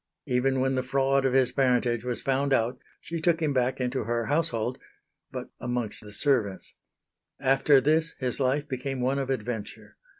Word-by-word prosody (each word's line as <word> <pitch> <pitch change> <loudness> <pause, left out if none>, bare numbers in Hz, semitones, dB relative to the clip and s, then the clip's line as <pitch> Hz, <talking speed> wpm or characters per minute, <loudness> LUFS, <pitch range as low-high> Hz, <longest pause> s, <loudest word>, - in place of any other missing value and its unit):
Even 130 +1 +1
when 135 +1 +1
the 130 - +1
fraud 135 +1 +1
of 130 - +1
his 130 -2 +3
parentage 125 -3 +1
was 125 -1 -3
found 135 +1 +1
out 120 0 +1 0.2
she 165 -1 -5
took 170 0 +2
him 155 -3 0
back 130 0 0
into 125 -1 -2
her 115 0 -1
household 130 -5 0 0.5
but - - -7
amongst 120 -2 -3
the 105 -1 -12
servants. 110 -6 +1 0.7
After 135 +1 +4
this 155 +4 +1
his 125 0 -3
life 140 +2 +1
became 135 -1 -4
one 135 +3 +1
of 135 -1 -3
adventure. 115 -4 -5
130 Hz, 170 wpm, -27 LUFS, 125-140 Hz, 0.7 s, After